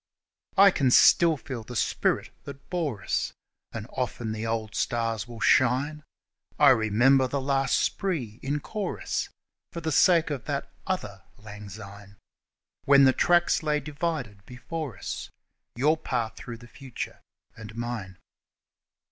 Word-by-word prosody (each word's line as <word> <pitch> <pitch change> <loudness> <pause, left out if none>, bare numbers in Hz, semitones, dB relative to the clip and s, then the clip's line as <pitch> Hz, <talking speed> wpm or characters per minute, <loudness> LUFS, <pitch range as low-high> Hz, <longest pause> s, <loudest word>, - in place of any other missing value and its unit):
I 200 0 +8
can 135 -7 +1
still 165 +5 +6
feel 125 -3 -6
the 125 +3 -9
spirit - - 0
that 140 0 -11
bore 150 - -2
us, - - -1 0.4
And 110 -2 -6
often 120 -3 -3
the 110 +1 -4
old 110 -1 -2
stars 115 -2 -1
will 120 -1 -10
shine 135 +6 +2 0.5
I 145 -1 +7
remember 130 +3 +4
the 140 +2 -2
last 135 0 +1
spree 135 - -2
in 145 +2 -2
chorus 210 +4 -3 0.4
For 170 - -5
the 160 -1 -3
sake 170 +1 +4
of 135 -5 -4
that 140 -2 -3 0.2
other 105 - -3 0.2
Lang 105 -1 -10
Syne, 100 0 -11 0.7
When 140 0 +7
the 130 -1 +6
tracks 175 +4 +3
lay 150 -1 +1
divided 145 -8 -4
before 130 - -6
us, - - -6 0.5
Your 150 +6 +2
path 120 -7 -3
through 120 -1 -8
the 120 +1 -14
future 130 0 -8 0.3
and 110 -1 -10
mine. 115 -6 -5
130 Hz, 140 wpm, -27 LUFS, 110-150 Hz, 0.7 s, I